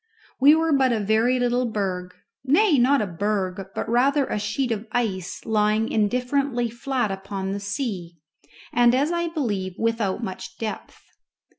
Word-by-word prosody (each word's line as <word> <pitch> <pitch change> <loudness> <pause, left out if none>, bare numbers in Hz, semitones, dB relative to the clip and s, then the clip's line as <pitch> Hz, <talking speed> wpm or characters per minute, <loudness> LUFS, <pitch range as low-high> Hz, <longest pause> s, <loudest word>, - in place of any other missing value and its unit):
We 285 +4 +7
were 325 -1 +1
but 265 -2 +3
a 230 - +1
very 220 +5 +2
little 245 0 +1
berg, 185 -4 -3 0.3
nay, 305 +3 +4
not 260 +1 +4
a - - -1
berg, 195 0 -2
but - - -3
rather 270 +4 +3
a 210 - -2
sheet 220 +5 -1
of 220 0 -3
ice 195 -7 -2
lying 215 0 +1
indifferently 245 +2 0
flat 240 -2 -2
upon 195 0 -4
the 200 - -3
sea, 200 -5 -4 0.6
and, 240 0 +5
as 285 +5 +1
I 340 0 0
believe, 205 - -2
without 225 -4 -1
much 185 0 -6
depth. 220 -2 -6
225 Hz, 155 wpm, -24 LUFS, 200-260 Hz, 0.6 s, We